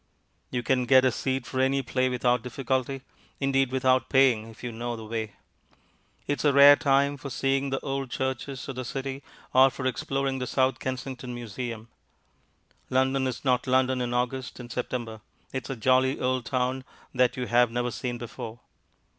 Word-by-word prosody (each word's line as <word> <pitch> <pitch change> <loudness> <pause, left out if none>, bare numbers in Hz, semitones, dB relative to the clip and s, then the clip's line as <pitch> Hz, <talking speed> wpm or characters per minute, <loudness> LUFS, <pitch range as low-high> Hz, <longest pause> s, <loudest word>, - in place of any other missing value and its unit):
You 125 - -2
can 125 0 +1
get 130 0 +6
a 130 - +4
seat 130 +1 -2
for 130 - -4
any 135 +1 +2
play 130 0 0
without 125 -1 +1
difficulty 130 +2 -2 0.4
indeed, 135 -2 +1
without 130 0 +2
paying, 130 -5 +4
if 110 - -15
you 120 - -3
know 120 +1 -4
the 110 -1 -8
way. 110 -1 -4 0.9
It 145 - -1
is - - -2
a 145 - +6
rare 140 +1 +9
time 140 -1 +2
for 140 +1 -7
seeing 135 +2 0
the 135 0 -1
old 135 -2 -3
churches 130 +1 -3
of 135 - -6
the 130 - -3
City 135 +2 -4 0.3
or 130 +1 +7
for 130 0 -6
exploring 135 +1 -1
the 125 - -3
South 130 -1 +1
Kensington 130 -1 -5
Museum. 115 0 -6 1.0
London 130 +1 +2
is 130 +2 -5
not 125 0 +2
London 130 0 +2
in 120 -1 -2
August 125 +2 -2
and 120 -1 -9
September; 115 -3 -4 0.3
it 130 -2 -3
is - - -9
a 135 - -2
jolly 130 +3 +2
old 125 -1 -1
town 130 0 -1 0.3
that 125 -1 +2
you 125 - -2
have 120 0 +4
never 120 +1 -2
seen 120 0 -4
before. 120 0 -8
130 Hz, 180 wpm, -27 LUFS, 120-135 Hz, 1.0 s, rare